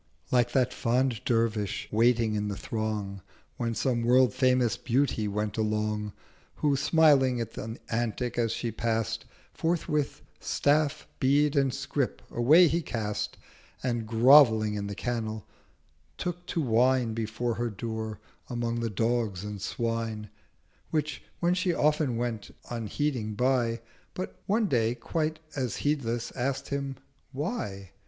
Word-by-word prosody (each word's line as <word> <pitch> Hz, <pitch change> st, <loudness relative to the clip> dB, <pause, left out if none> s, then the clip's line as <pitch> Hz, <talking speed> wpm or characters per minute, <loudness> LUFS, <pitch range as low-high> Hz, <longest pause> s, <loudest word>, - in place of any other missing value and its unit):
Like 125 Hz, -2 st, +3 dB
that 130 Hz, -3 st, +2 dB
fond 125 Hz, -1 st, +1 dB
Dervish 115 Hz, -4 st, 0 dB
waiting 115 Hz, 0 st, +3 dB
in 105 Hz, 0 st, -1 dB
the 100 Hz, -1 st, -3 dB
throng 105 Hz, -3 st, -3 dB, 0.4 s
When 115 Hz, -1 st, -1 dB
some 120 Hz, +1 st, 0 dB
World 125 Hz, 0 st, +4 dB
famous 125 Hz, -3 st, +3 dB
Beauty 125 Hz, -3 st, 0 dB
went 105 Hz, +1 st, -2 dB
along, 105 Hz, -1 st, -1 dB, 0.4 s
Who 145 Hz, -2 st, +2 dB
smiling 140 Hz, -4 st, +4 dB
on 115 Hz, -, -1 dB, 0.3 s
the -, -, -17 dB
Antic 120 Hz, +1 st, -2 dB
as 115 Hz, -2 st, +1 dB
she 115 Hz, +1 st, -2 dB
pass'd—240 115 Hz, 0 st, -1 dB, 0.3 s
Forthwith 155 Hz, -3 st, -1 dB, 0.2 s
Staff, 145 Hz, +1 st, +1 dB
Bead 145 Hz, +2 st, +3 dB
and 135 Hz, -2 st, +3 dB
Scrip -, -, -2 dB
away 155 Hz, +9 st, +6 dB
he 165 Hz, +3 st, +1 dB
cast, 110 Hz, -8 st, -3 dB, 0.5 s
And 120 Hz, -3 st, -1 dB
grovelling 115 Hz, -2 st, +6 dB
in 100 Hz, -1 st, -3 dB
the 100 Hz, -, -5 dB
Kennel, 110 Hz, -3 st, -3 dB, 0.7 s
took 175 Hz, 0 st, -4 dB
to 170 Hz, -, -1 dB
whine 125 Hz, -1 st, +3 dB
Before 115 Hz, +2 st, -2 dB
her 120 Hz, +2 st, -2 dB
Door 110 Hz, 0 st, -5 dB, 0.3 s
among 120 Hz, -1 st, -2 dB
the 115 Hz, -1 st, -1 dB
Dogs 110 Hz, -3 st, 0 dB
and 105 Hz, -2 st, -6 dB
Swine. 115 Hz, -1 st, -3 dB, 0.6 s
Which 150 Hz, -3 st, -1 dB, 0.2 s
when 175 Hz, +1 st, +3 dB
she 180 Hz, -1 st, +1 dB
often 150 Hz, -5 st, +2 dB
went 115 Hz, -3 st, -3 dB, 0.2 s
unheeding 115 Hz, -1 st, -2 dB
by, 120 Hz, -1 st, +1 dB, 0.3 s
But 185 Hz, -, -6 dB
one 220 Hz, +3 st, +2 dB
day 120 Hz, -, +1 dB
quite 155 Hz, +6 st, -2 dB, 0.2 s
as 130 Hz, -5 st, -1 dB
heedless 120 Hz, -6 st, -1 dB
ask'd 130 Hz, +2 st, -2 dB
him—'Why?' 135 Hz, -, -5 dB
120 Hz, 135 wpm, -28 LUFS, 110-135 Hz, 0.7 s, away